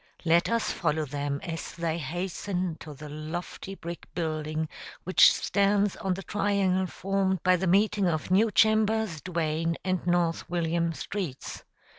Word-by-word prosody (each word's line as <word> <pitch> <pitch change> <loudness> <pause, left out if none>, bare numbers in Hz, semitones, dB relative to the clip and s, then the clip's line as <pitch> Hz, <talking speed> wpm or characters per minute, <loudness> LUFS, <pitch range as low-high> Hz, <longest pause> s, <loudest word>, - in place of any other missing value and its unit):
Let 170 +1 +4
us 230 -1 +1
follow 155 0 0
them 140 0 -3
as 165 -1 -5
they 170 -1 -1
hasten 175 +3 -3
to 150 -2 -9
the 150 +2 -9
lofty 160 +5 -6
brick 170 -2 -8
building 155 -1 -2 0.4
which 185 - +7
stands 200 0 +2
on 190 -1 -1
the 195 - -7
triangle 195 -1 +1
formed 190 -1 -1
by 185 0 +5
the 185 +1 -1
meeting 200 +1 +3
of 160 +1 -1
New 215 +4 +5
Chambers, 215 -3 +2
Duane, 165 -2 -1
and 185 -1 0
North 175 -1 +1
William 170 -1 0
streets. 170 -7 -5
175 Hz, 145 wpm, -28 LUFS, 160-195 Hz, 0.4 s, which